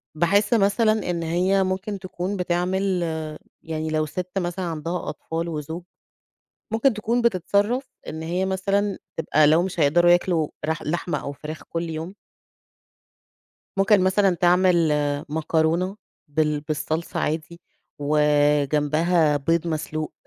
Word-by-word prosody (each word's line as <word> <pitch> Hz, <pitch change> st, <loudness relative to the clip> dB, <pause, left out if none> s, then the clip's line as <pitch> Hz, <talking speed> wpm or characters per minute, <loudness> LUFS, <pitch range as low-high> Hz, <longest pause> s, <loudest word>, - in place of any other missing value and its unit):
باحس 200 Hz, +7 st, +2 dB
مثلًا 215 Hz, 0 st, +2 dB
إن 170 Hz, -1 st, -1 dB
هي 185 Hz, +4 st, +2 dB
ممكن 190 Hz, +2 st, -3 dB
تكون 185 Hz, +2 st, -4 dB
بتعمل 180 Hz, +1 st, 0 dB, 0.6 s
يعني 160 Hz, -1 st, -3 dB
لو 155 Hz, 0 st, +1 dB
ست 180 Hz, +4 st, -5 dB
مثلًا 180 Hz, 0 st, -2 dB
عندها 165 Hz, +1 st, -3 dB
أطفال 165 Hz, +2 st, -4 dB
وزوج، 160 Hz, +2 st, -5 dB, 0.9 s
ممكن 225 Hz, +3 st, +3 dB
تكون 230 Hz, +3 st, 0 dB
بتتصرّف 220 Hz, +4 st, +1 dB, 0.2 s
إن 160 Hz, -, -5 dB
هي 175 Hz, +4 st, -1 dB
مثلًا 195 Hz, +1 st, 0 dB, 0.2 s
تبقى 155 Hz, -1 st, +3 dB
لو 160 Hz, +3 st, +5 dB
مش 185 Hz, -2 st, -4 dB
هيقدروا 175 Hz, +4 st, +5 dB
ياكلوا 175 Hz, -3 st, +2 dB, 0.2 s
رح 160 Hz, 0 st, -2 dB
لحمة 175 Hz, +3 st, -2 dB
أو 140 Hz, -, -4 dB
فراخ 155 Hz, +2 st, -8 dB
كل 165 Hz, 0 st, -4 dB
يوم. 160 Hz, +3 st, -5 dB, 1.6 s
ممكن 195 Hz, +1 st, +4 dB
مثلًا 190 Hz, 0 st, +3 dB
تعمل 175 Hz, -1 st, +3 dB, 0.4 s
مكرونة 160 Hz, +4 st, 0 dB, 0.3 s
بال 150 Hz, 0 st, 0 dB
بالصلصة 155 Hz, +2 st, -3 dB
عادي 160 Hz, +2 st, -3 dB, 0.4 s
وجنبها 150 Hz, +2 st, +2 dB
بيض 165 Hz, +4 st, 0 dB
مسلوق 155 Hz, -1 st, -3 dB
170 Hz, 120 wpm, -24 LUFS, 155-190 Hz, 1.6 s, لو